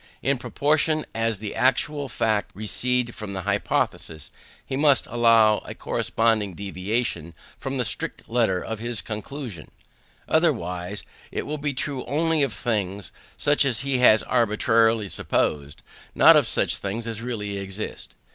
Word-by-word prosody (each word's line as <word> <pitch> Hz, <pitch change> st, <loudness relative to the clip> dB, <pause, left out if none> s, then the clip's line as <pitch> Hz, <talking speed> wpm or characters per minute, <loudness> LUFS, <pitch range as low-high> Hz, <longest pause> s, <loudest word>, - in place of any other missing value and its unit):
In 135 Hz, -2 st, +1 dB
proportion 155 Hz, +3 st, +1 dB
as 115 Hz, -1 st, 0 dB
the 105 Hz, +1 st, -6 dB
actual 140 Hz, +2 st, +1 dB
facts 110 Hz, -2 st, -1 dB
recede 120 Hz, +3 st, 0 dB
from 105 Hz, -2 st, -7 dB
the 95 Hz, -1 st, -4 dB
hypothesis, 80 Hz, -2 st, -1 dB, 0.3 s
he -, -, -4 dB
must 145 Hz, -1 st, +4 dB
allow 115 Hz, -2 st, +4 dB
a -, -, -9 dB
corresponding 110 Hz, -5 st, 0 dB
deviation 95 Hz, -3 st, -3 dB, 0.2 s
from 135 Hz, -1 st, -3 dB
the 125 Hz, -, 0 dB
strict 115 Hz, -, -3 dB
letter 115 Hz, -6 st, +1 dB
of 110 Hz, -1 st, -4 dB
his 120 Hz, 0 st, -3 dB
conclusion; 110 Hz, -, -6 dB, 0.6 s
otherwise 90 Hz, +3 st, 0 dB, 0.3 s
it -, -, -3 dB
will 150 Hz, 0 st, -4 dB
be 145 Hz, -1 st, -2 dB
true 135 Hz, -1 st, -3 dB
only 160 Hz, +1 st, +1 dB
of 135 Hz, -3 st, +2 dB
things 105 Hz, -4 st, -2 dB, 0.3 s
such 145 Hz, 0 st, +3 dB
as 130 Hz, -4 st, 0 dB
he 135 Hz, -1 st, 0 dB
has 110 Hz, -3 st, +6 dB
arbitrarily 115 Hz, -2 st, +2 dB
supposed, 75 Hz, -5 st, -1 dB, 0.3 s
not -, -, +8 dB
of -, -, +4 dB
such -, -, 0 dB
things 105 Hz, +4 st, -4 dB
as 115 Hz, -1 st, -4 dB
really 105 Hz, -5 st, -3 dB
exist. 100 Hz, +2 st, -5 dB
115 Hz, 145 wpm, -24 LUFS, 100-130 Hz, 0.6 s, not